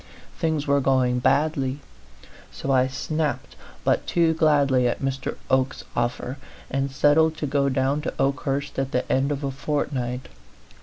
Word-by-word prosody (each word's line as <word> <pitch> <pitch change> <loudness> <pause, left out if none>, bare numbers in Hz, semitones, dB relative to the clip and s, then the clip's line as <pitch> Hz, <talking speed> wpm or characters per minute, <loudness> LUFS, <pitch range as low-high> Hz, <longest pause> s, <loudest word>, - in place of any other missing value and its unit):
Things 160 -3 -1
were 140 -1 +3
going 130 -2 +2
badly. 140 0 +1 0.7
So 135 - -3
I 130 -1 +4
snapped 150 +3 -3 0.3
but - - +1
too 165 -2 +3
gladly 140 -5 +3
at 120 - -1
Mr. 135 0 -2
Oke's 130 0 +1
offer, 120 +3 -2 0.3
and 135 +1 0
settled 155 +3 +3
to 155 - -2
go 140 0 +1
down 135 +2 +1
to - - -3
Okehurst 140 0 -1
at 135 0 -2
the 125 - 0
end 135 +2 +2
of 145 0 -3
a 135 - -1
fortnight. 130 -3 -2
135 Hz, 150 wpm, -24 LUFS, 130-150 Hz, 0.7 s, I